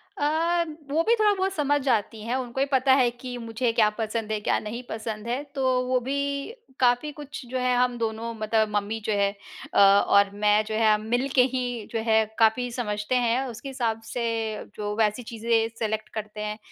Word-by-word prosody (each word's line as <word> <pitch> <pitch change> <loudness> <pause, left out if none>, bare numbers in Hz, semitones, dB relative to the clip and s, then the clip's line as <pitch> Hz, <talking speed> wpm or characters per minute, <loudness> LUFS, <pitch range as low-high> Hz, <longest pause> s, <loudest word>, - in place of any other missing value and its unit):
अ, 330 +4 +1 0.3
वो 320 +3 +3
भी 465 - +5
थोड़ा-बहुत 390 -3 +2
समझ 290 -2 +1
जाती 225 -4 0
हैं, 240 +2 -1
उनको 255 0 -4
ये 275 - +3
पता 265 0 +4
है 255 -3 +4
कि 245 +1 -7
मुझे 230 +1 -1
क्या 215 -2 +4
पसंद 220 -1 -3
है, 215 - 0
क्या - - +1
नहीं 220 +3 -6
पसंद 220 0 -5
है, 250 +4 -2
तो 260 -2 +2
वो 255 0 +2
भी 280 +6 -2 0.3
काफ़ी 250 +4 +2
कुछ 290 -2 -9
जो 260 - -2
है 250 0 +2
हम 245 -1 +2
दोनों 225 0 -3
मतलब 215 0 +1
मम्मी 205 +2 -1
जो 215 - +1
है 200 0 +3 0.4
अ, - - +3
और 200 0 +6
मैं 210 +1 +3
जो 215 0 -4
है 220 -1 +4
हम 210 - 0
मिलके 260 +1 +3
ही 255 -1 0 0.3
जो 230 - -1
है 220 0 +4
काफ़ी 230 +2 +3
समझते 210 -1 -2
हैं। 235 +3 +2
उसके 240 +3 -7
हिसाब 235 -4 -2
से, 240 -1 -1 0.5
जो 210 0 -3
वैसी 220 +2 +1
चीज़ें 225 0 0
सेलेक्ट 220 -1 -2
करते 215 -1 -6
हैं, 210 0 -3
235 Hz, 195 wpm, -26 LUFS, 215-260 Hz, 0.5 s, और